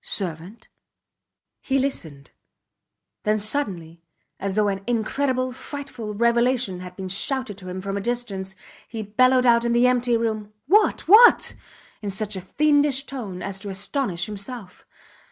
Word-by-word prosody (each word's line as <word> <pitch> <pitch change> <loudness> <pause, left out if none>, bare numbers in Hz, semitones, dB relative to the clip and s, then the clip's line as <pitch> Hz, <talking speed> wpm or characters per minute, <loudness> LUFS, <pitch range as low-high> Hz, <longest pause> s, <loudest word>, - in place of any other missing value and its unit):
Servant? 185 +4 -5 0.9
He 270 - 0
listened, 160 - -3 0.9
then, 215 0 +1
suddenly, 195 - -1 0.4
as 195 0 -3
though 210 -1 +3
an 195 -1 -2
incredible, 255 +2 0
frightful 255 -6 -7
revelation 235 -3 +2
had 180 0 -9
been 190 0 -6
shouted 235 +4 -1
to 185 -1 -9
him 185 +1 -5
from 195 +1 -3
a - - -2
distance, 200 -5 -3 0.3
he 225 -2 -5
bellowed 255 +5 +3
out 235 -1 +5
in 235 0 +1
the 240 +1 +4
empty 245 -1 +2
room: 215 -2 -3
What! 415 +8 +3
What! 445 +6 +7 0.5
in 205 - -4
such 210 +1 -3
a 190 - -5
fiendish 290 +5 +2
tone 220 -11 -6
as 195 -1 -5
to 200 - -6
astonish 195 - -2
himself. 205 -1 -8
220 Hz, 145 wpm, -23 LUFS, 195-255 Hz, 0.9 s, What